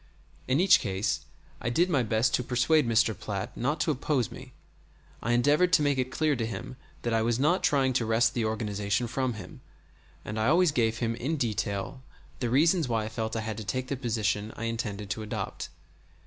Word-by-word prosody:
In 130 +3 +2
each 190 +2 +6
case 95 0 -2 0.4
I 120 - -1
did 170 +9 +2
my 150 -8 +2
best 110 +1 +1
to 125 - +2
persuade 125 +4 +2
Mr. 115 -1 +3
Platt 105 -2 -5
not 145 +6 -1
to 160 - +2
oppose 135 -3 -1
me. 130 -1 -11 0.7
I 115 - 0
endeavored 145 +9 +3
to 160 -5 +5
make 140 -2 +1
it 130 0 0
clear 155 +2 +1
to 115 - -1
him 115 +4 -6 0.3
that 120 - -1
I 115 - +2
was 115 +1 +1
not 155 +8 +2
trying 135 -4 +2
to 120 -2 +1
wrest 115 +1 +3
the 120 - -1
organization 105 0 -1
from 125 +2 -1
him; 105 - -10 0.6
and 105 +1 -4
I 110 - +1
always 170 +3 +4
gave 115 -4 +1
him 115 -1 -1
in 135 +7 -2
detail 110 0 -2 0.4
the 120 - -1
reasons 160 +5 +3
why 115 -3 0
I - - -4
felt 110 0 -3
I 115 - -1
had 110 -1 -4
to 110 - -5
take 130 +6 -3
the 140 - -1
position 110 -4 -1
I - - -6
intended 105 -3 -3
to 110 - -3
adopt. 105 - -5
120 Hz, 205 wpm, -28 LUFS, 110-135 Hz, 0.7 s, each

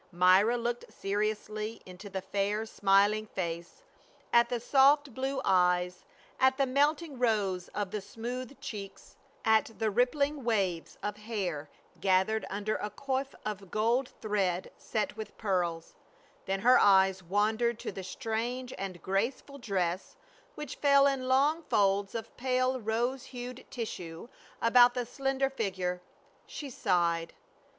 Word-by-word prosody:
Myra 185 +6 +5
looked 240 0 -3
seriously 215 +2 -2
into 185 +2 -10
the 190 -1 -4
fair 205 +3 -1
smiling 205 +1 +3
face, 170 - -5 0.5
at 235 0 +5
the 245 - -1
soft 275 +2 +4
blue 265 +2 -2
eyes, 180 -1 +2 0.3
at 260 0 +4
the 275 - +3
melting 290 +2 +1
rose 205 -7 +1
of 205 -2 -2
the 210 - -3
smooth 245 +6 -6
cheeks, 200 -3 -8 0.3
at 220 0 +3
the 220 -1 0
rippling 280 +5 +1
waves 195 -8 -1
of 210 0 -3
hair 190 -9 -4 0.3
gathered 190 +3 +2
under 205 +2 -2
a 210 - -4
coif 270 +4 -3
of 200 -3 -5
gold 235 +6 +1
thread 190 -4 -1
set 215 -2 -3
with 215 -1 -8
pearls; 175 -5 -1 0.5
then 195 0 -1
her 250 +4 +6
eyes 190 -1 +5
wandered 215 +5 +1
to - - -4
the 190 - -7
strange 235 +6 -3
and 190 -3 -5
graceful 235 +8 -2
dress 185 -6 -2 0.4
which 300 -3 -6
fell 280 -1 +5
in 270 -2 +1
long 285 +5 +3
folds 200 -7 +1
of 225 - -6
pale 255 0 +1
rose 240 +4 -1
hucd 250 0 -7
tissue 180 -7 -6 0.4
about 245 +1 +6
the 250 -1 -1
slender 270 +2 -1
figure. 185 -7 -2 0.5
She 285 -3 -7
sighed. 170 -6 0
215 Hz, 135 wpm, -30 LUFS, 195-250 Hz, 0.5 s, her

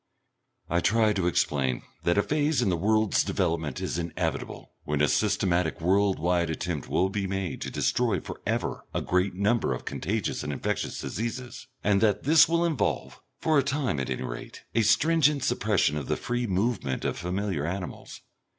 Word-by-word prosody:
I 85 - +1
try 110 +3 +3
to 95 -4 0
explain 70 -6 0 0.2
that 85 +3 +2
a 100 - +4
phase 150 0 +1
in - - +1
the 90 - +2
world's 110 +4 +2
development 80 -6 -1
is 85 - -2
inevitable 85 0 -4
when 75 -1 -1
a 75 - +4
systematic 85 +3 +1
world 95 +3 +2
wide 85 +1 +1
attempt 80 -2 -3
will 95 - +2
be 100 0 -2
made 95 -2 -3
to - - -3
destroy 115 -7 +1
for - - -9
ever - - -2
a - - +1
great 90 +1 +1
number 105 +4 +1
of - - -9
contagious 105 +5 -2
and 75 - -3
infectious 70 - -2
diseases, 120 +2 -5 0.2
and 100 -1 +3
that 105 -2 +2
this 155 +2 +6
will 170 +1 +2
involve, 160 -5 -1 0.2
for 155 -2 +3
a - - +2
time 140 - -1
at 65 - -3
any 65 0 -2
rate, - - -7
a 115 - +3
stringent 150 +4 +3
suppression 110 - +1
of 70 - -4
the - - 0
free 120 0 -2
movement 95 - -1
of - - 0
familiar 90 -3 -2
animals. 90 0 -6
95 Hz, 180 wpm, -27 LUFS, 85-120 Hz, 0.2 s, this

